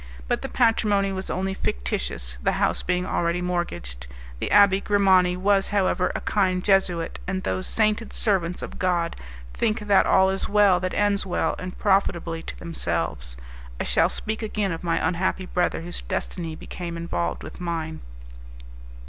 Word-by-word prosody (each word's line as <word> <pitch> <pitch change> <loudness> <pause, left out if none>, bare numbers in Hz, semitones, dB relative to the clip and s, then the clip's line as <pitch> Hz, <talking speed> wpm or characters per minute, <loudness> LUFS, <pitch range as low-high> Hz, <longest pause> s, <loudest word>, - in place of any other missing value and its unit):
But - - 0
the - - -5
patrimony 210 -4 +2
was 190 0 -4
only 190 +1 -1
fictitious, - - -3
the - - +1
house - - +1
being 180 0 0
already 170 0 0
mortgaged; 85 - -3 0.3
the - - -2
Abbé 200 -1 +5
Grimani 190 -3 +4
was, 195 +1 +2
however, 185 -2 +1
a - - -2
kind 185 -3 +1
Jesuit, 185 -4 +1
and 190 0 -2
those 185 - -2
sainted 215 0 +1
servants 180 -5 0
of - - -7
God 175 -2 0 0.4
think 220 0 0
that 205 -2 +4
all 190 0 +5
is 195 - -3
well 205 -3 +5
that 185 0 -3
ends 205 -1 +2
well 185 - 0
and 180 0 -6
profitably 175 -5 +1
to - - -6
themselves. 80 - -3 0.4
I - - 0
shall - - +3
speak 220 +1 -3
again 210 -3 -1
of 165 +1 -5
my 165 -1 +1
unhappy 185 +1 -1
brother 180 -2 0
whose 175 +1 -4
destiny 165 -3 -4
became 170 +1 -6
involved 85 - -2
with - - -9
mine. 165 -2 -3
185 Hz, 160 wpm, -24 LUFS, 170-200 Hz, 0.4 s, Abbé